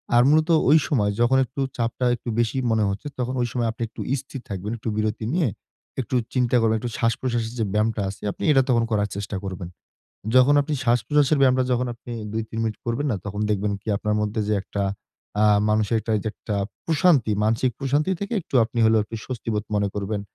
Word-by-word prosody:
আর 120 Hz, -, +7 dB
মূলত 155 Hz, +3 st, +3 dB, 0.2 s
ঐ -, -, +6 dB, 0.2 s
সময় 105 Hz, -7 st, +2 dB
যখন 130 Hz, +3 st, +4 dB
একটু 135 Hz, +3 st, -6 dB, 0.2 s
চাপটা 120 Hz, +1 st, -1 dB
একটু 120 Hz, -, -7 dB
বেশি 120 Hz, +2 st, +1 dB
মনে 110 Hz, -1 st, +2 dB
হচ্ছে, 100 Hz, +8 st, -4 dB
তখন 125 Hz, +1 st, -1 dB
ঐ -, -, +2 dB
সময় 120 Hz, -2 st, 0 dB
আপনি 115 Hz, -, -13 dB
একটু -, -, -9 dB, 0.2 s
স্থির 135 Hz, -1 st, -9 dB
থাকবেন। 100 Hz, +2 st, -4 dB
একটু 115 Hz, -, -4 dB
বিরতি 110 Hz, 0 st, -1 dB
নিয়ে 165 Hz, -9 st, +2 dB, 0.5 s
একটু 130 Hz, -, -4 dB, 0.2 s
চিন্তা 125 Hz, -1 st, +2 dB
করবেন 110 Hz, 0 st, +3 dB
একটু 120 Hz, +1 st, -4 dB
শ্বাসপ্রশ্বাসের 115 Hz, 0 st, -1 dB
যে 110 Hz, -, +1 dB
ব্যায়ামটা 105 Hz, 0 st, +1 dB
আছে 100 Hz, 0 st, -9 dB
আপনি -, -, -9 dB
এইটা 135 Hz, -3 st, +6 dB
তখন 115 Hz, -2 st, +3 dB
করার 105 Hz, -1 st, +1 dB
চেষ্টা 100 Hz, 0 st, -4 dB
করবেন। 95 Hz, -2 st, -5 dB, 0.7 s
যখন 130 Hz, +3 st, +6 dB
আপনি 150 Hz, +1 st, -3 dB
শ্বাসপ্রশ্বাসের 135 Hz, +5 st, +3 dB
ব্যায়ামটা 130 Hz, -1 st, +4 dB
যখন 125 Hz, +1 st, +1 dB
আপনি 120 Hz, +1 st, -10 dB, 0.2 s
২ 115 Hz, -, -1 dB
৩ 115 Hz, -, -6 dB
মিনিট 110 Hz, -1 st, -2 dB
করবেন 125 Hz, +6 st, -1 dB
না, 110 Hz, -, 0 dB
তখন 105 Hz, +1 st, -4 dB
দেখবেন 105 Hz, 0 st, 0 dB
কি? -, -, -41 dB
আপনার 105 Hz, +1 st, -1 dB
মধ্যে, 105 Hz, +1 st, -1 dB
যে 105 Hz, -, +2 dB
একটা 100 Hz, -1 st, -3 dB, 0.6 s
আ -, -, +6 dB, 0.3 s
মানুষের 110 Hz, +1 st, +2 dB
একটা 110 Hz, -, -3 dB
এইযে 110 Hz, +1 st, -2 dB
একটা 105 Hz, -, -5 dB, 0.3 s
প্রশান্তি 150 Hz, -8 st, +3 dB
মানসিক 115 Hz, +3 st, +2 dB
প্রশান্তি 145 Hz, +6 st, +1 dB
থেকে 200 Hz, +3 st, -4 dB
একটু 155 Hz, -, -12 dB
আপনি 115 Hz, +2 st, -5 dB
হলেও 110 Hz, 0 st, +5 dB
একটু 115 Hz, +2 st, -7 dB
স্বস্তিবোধ 110 Hz, -4 st, -3 dB
মনে 100 Hz, -1 st, +1 dB
করবেন। 100 Hz, 0 st, -2 dB
115 Hz, 205 wpm, -24 LUFS, 105-130 Hz, 0.7 s, আর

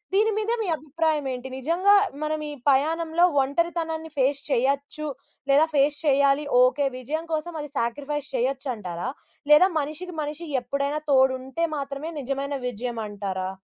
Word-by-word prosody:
దీని 435 Hz, +2 st, +3 dB
మీద 435 Hz, +1 st, -1 dB
మీ -, -, -3 dB
అభిప్రాయం 310 Hz, 0 st, -1 dB
ఏంటి? 250 Hz, +1 st, -6 dB
నిజంగా 350 Hz, +9 st, +3 dB, 0.3 s
మనం 310 Hz, 0 st, -2 dB
ఈ -, -, -5 dB, 0.2 s
పయాణంలో 320 Hz, +5 st, +2 dB, 0.2 s
ఒంటరితనాన్ని 320 Hz, +2 st, -2 dB
ఫేస్ 275 Hz, +2 st, +2 dB
చేయొచ్చు 280 Hz, +4 st, 0 dB, 0.4 s
లేదా 300 Hz, +4 st, +5 dB
ఫేస్ 285 Hz, +1 st, +3 dB
చెయ్యాలి. 280 Hz, +1 st, +3 dB, 0.2 s
ఓకే 275 Hz, +2 st, +3 dB
విజయం 310 Hz, +6 st, -3 dB
కోసం 315 Hz, +2 st, -2 dB
అది 295 Hz, -1 st, -8 dB
సాక్రిఫైస్ 285 Hz, +5 st, -2 dB
చేయొచ్చంటారా? 245 Hz, -, -2 dB, 0.4 s
లేదా 365 Hz, +6 st, +8 dB
మనిషికి 315 Hz, +4 st, -5 dB
మనిషి 300 Hz, +3 st, -4 dB, 0.2 s
ఎప్పుడైనా 280 Hz, +4 st, -1 dB
తోడుంటే 265 Hz, +4 st, +2 dB
మాత్రమే 280 Hz, +3 st, -4 dB
నిజమైన 275 Hz, +2 st, -3 dB, 0.2 s
విజయమంటారా? 205 Hz, -5 st, -4 dB
285 Hz, 130 wpm, -25 LUFS, 265-320 Hz, 0.4 s, లేదా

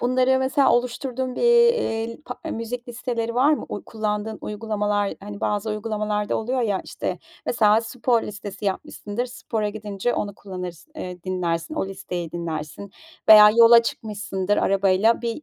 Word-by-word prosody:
Bunları 255 Hz, +1 st, +3 dB
mesela 265 Hz, +1 st, +3 dB
oluşturduğun 250 Hz, +1 st, -1 dB
bir, -, -, -2 dB
eee, 470 Hz, -, +3 dB
pa 250 Hz, -, -6 dB
eee, -, -, -4 dB
müzik 240 Hz, +2 st, -5 dB
listeleri 235 Hz, -1 st, -3 dB
var 270 Hz, +5 st, +4 dB
mı? 300 Hz, -, -2 dB
Uy 205 Hz, -, -5 dB
kullandığın 215 Hz, 0 st, -3 dB
uygulamalar, 210 Hz, -1 st, -1 dB
hani, 205 Hz, 0 st, -8 dB
bazı 210 Hz, +1 st, -1 dB
uygulamalarda 210 Hz, -1 st, -2 dB
oluyor 250 Hz, +4 st, -1 dB
ya, 205 Hz, -4 st, 0 dB
işte, -, -, -4 dB, 0.3 s
mesela, 215 Hz, -2 st, +4 dB
spor 235 Hz, 0 st, 0 dB
listesi 205 Hz, 0 st, -7 dB
yapmışsındır, 205 Hz, +4 st, -3 dB
spora 225 Hz, -3 st, -3 dB
gidince 210 Hz, +1 st, -3 dB
onu 205 Hz, -1 st, -3 dB
kullanırsın, 185 Hz, -, -8 dB
eee, 180 Hz, -, -7 dB
dinlersin, 180 Hz, -, -2 dB
o 305 Hz, -, -1 dB
listeyi 180 Hz, -3 st, -6 dB
dinlersin 165 Hz, +2 st, -5 dB, 0.4 s
veya 210 Hz, -1 st, +10 dB
yola 230 Hz, +1 st, +7 dB
çıkmışsındır 205 Hz, -3 st, -2 dB
arabayla 195 Hz, +3 st, +3 dB
bir 235 Hz, +5 st, -3 dB
215 Hz, 150 wpm, -23 LUFS, 200-240 Hz, 0.4 s, veya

